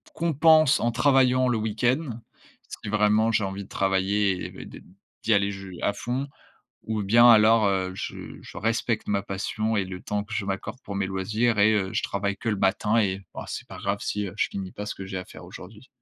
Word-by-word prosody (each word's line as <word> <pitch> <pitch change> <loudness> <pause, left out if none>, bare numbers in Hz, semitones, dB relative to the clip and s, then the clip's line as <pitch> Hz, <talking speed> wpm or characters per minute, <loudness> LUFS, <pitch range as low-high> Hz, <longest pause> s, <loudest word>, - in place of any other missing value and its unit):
compense 155 -2 +4
en 120 - +1
travaillant 130 +1 +3
le 120 -3 +1
week-end. 120 +8 0 0.7
Si 105 - -5
vraiment 105 +1 +3
j'ai 110 -1 +1
envie 95 +1 -4
de - - -20
travailler 95 0 0
et - - -5
de - - -10 0.2
de - - -18 0.4
d'y 115 - +3
aller 100 0 +1
je 95 -1 -8 0.2
à 100 - +1
fond 125 +6 -3 0.6
ou 110 -1 -2
bien 115 +5 +6
alors, 110 -1 +6
heu, 95 -1 0
je - - -7
je - - -11
respecte 115 +1 -1
ma 100 -1 0
passion 110 +3 -2
et 100 -3 0
le 90 -1 -8
temps 105 0 -2
que 110 +1 -10
je 105 - -2
m'accorde 95 +5 -4
pour 100 - -6
mes 100 -1 -1
loisirs 105 +5 0
et 105 +2 +5
heu, 100 -3 0
je - - -1
travaille 100 0 -2
que - - -7
le 105 - +1
matin 100 +3 +1
et 95 -1 -1
ah - - -7
c'est - - -6
pas - - -10
grave 100 +1 -1
si, 105 -1 -2
heu, 90 - -8
je - - +2
finis 95 -2 -6
pas 105 - -7
ce - - -4
que 95 - -8
j'ai 95 - -5
à 90 - -6
faire - - -12
aujourd'hui. 105 +7 -12
105 Hz, 225 wpm, -25 LUFS, 100-115 Hz, 0.7 s, bien